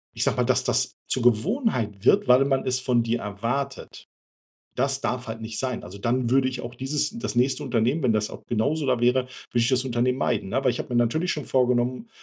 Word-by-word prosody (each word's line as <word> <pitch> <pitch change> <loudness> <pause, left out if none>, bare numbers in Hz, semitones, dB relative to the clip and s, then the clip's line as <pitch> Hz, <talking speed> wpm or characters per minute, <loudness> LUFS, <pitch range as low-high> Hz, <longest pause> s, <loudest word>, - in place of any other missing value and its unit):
ich - - -1
sage - - +1
mal, - - +3
dass - - +2
das - - 0
zur 130 - 0
Gewohnheit 120 - +1
wird, - - +4
weil 125 +2 +6
man 135 -1 0
es 130 0 0
von 125 -2 +1
dir 115 +1 -1
erwartet. 115 +8 -4 0.7
Das 135 0 0
darf 125 0 -2
halt 110 0 -6
nicht 110 0 -5
sein. 130 -2 -3
Also, 90 +3 -9
dann 120 +3 0
würde 130 +1 +3
ich 130 -1 -4
auch 120 0 -7
dieses 135 - -1
das 225 - -4
nächste 130 +4 +2
Unternehmen, 125 +3 +1
wenn 120 -3 +3
das 105 0 0
auch - - -9
genauso 140 +7 0
da 125 -3 +1
wäre, 125 +2 +3
würde - - -20 0.3
ich 115 - +3
das 130 -1 +2
Unternehmen 125 0 0
meiden, 115 -7 0
ne? 135 +6 -1
Weil 130 - +3
ich - - -6
habe - - -5
mir 120 - -2
natürlich 140 +10 +1
schon 150 - -3
vorgenommen 125 - +1
125 Hz, 230 wpm, -25 LUFS, 115-135 Hz, 0.7 s, weil